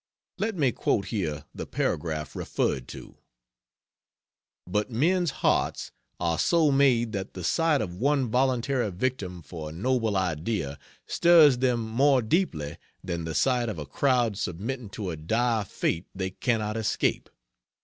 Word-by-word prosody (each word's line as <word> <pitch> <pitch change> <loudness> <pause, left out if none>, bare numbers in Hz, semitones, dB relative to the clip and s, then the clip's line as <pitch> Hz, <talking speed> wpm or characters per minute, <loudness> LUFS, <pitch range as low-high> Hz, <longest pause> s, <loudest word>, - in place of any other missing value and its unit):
Let 220 -1 -1
me 140 -7 +2
quote 100 -3 0
here 85 -10 -2
the - - -6
paragraph 75 -1 -2
referred 65 -2 -1
to: - - -11 1.5
"But 105 +6 -1
men's 170 +9 +2 0.2
hearts - - +1 0.3
are 85 -2 0
so 165 -4 +3
made 130 -5 +3
that 100 -2 -5
the 90 - -6
sight 160 - +2
of 90 -4 -5
one 140 +2 +2
voluntary 125 -1 +1
victim 95 -4 -3
for 75 +1 -7
a - - -9
noble 115 +2 0
idea 85 -4 -2 0.3
stirs 160 -7 +6
them 125 -2 +2
more 130 +3 +3
deeply 110 - -1 0.3
than 85 -2 -3
the 80 -1 -4
sight 125 - +2
of 105 - -4
a 75 - -5
crowd 120 - +1
submitting 105 +7 -4
to 100 -4 -3
a - - -4
dire 110 +7 0
fate 85 -1 -2
they 95 0 -3
cannot 110 0 -1
escape. 110 - 0
110 Hz, 145 wpm, -27 LUFS, 90-130 Hz, 1.5 s, stirs